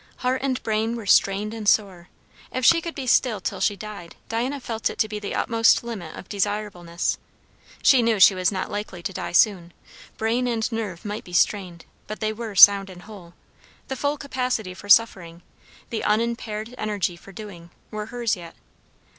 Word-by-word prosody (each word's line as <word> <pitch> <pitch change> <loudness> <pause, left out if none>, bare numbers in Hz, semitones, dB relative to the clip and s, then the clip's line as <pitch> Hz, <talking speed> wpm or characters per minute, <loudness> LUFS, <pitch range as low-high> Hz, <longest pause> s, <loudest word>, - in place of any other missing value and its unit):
Heart 255 +1 +1
and 260 -2 -1
brain 220 +1 -1
were 230 -3 -7
strained 200 +2 +3
and 215 -2 0
sore; 185 -5 0 0.4
if 255 -1 -2
she 335 +3 +6
could 335 0 -6
be 275 - -5
still 240 -3 +2
till - - -4
she 205 - +2
died, 200 -5 -9
Diana 250 +5 -2
felt 225 -3 -3
it - - -8
to 215 - +1
be 210 0 -5
the 205 - -5
utmost 230 0 +3
limit 200 -9 -7
of - - -10
desirableness. 200 -4 -2 0.6
She 260 -3 +6
knew 230 -3 +1
she 195 - +8
was 185 +1 0
not 190 -2 -4
likely 205 -4 -6
to 195 - -4
die 170 -1 -5
soon; 175 -2 +2 0.4
brain 235 +3 0
and 230 -2 0
nerve 215 -6 -5
might 210 +1 -5
be 180 - -13
strained, 175 -2 0 0.2
but 215 - -6
they 215 -1 -1
were 220 -2 -7
sound 195 0 +8
and 180 -1 -12
whole; 190 -5 -13 0.5
the 265 - -2
full 285 +3 -1
capacity 250 -8 -3
for 205 +2 -12
suffering, 180 -6 +3 0.5
the 225 - -3
unimpaired 225 0 -1
energy 205 -5 -2
for 195 - -15
doing, 185 -4 -10 0.2
were 215 0 -5
hers 235 -1 -1
yet. 170 -2 -11
210 Hz, 185 wpm, -23 LUFS, 190-230 Hz, 0.6 s, she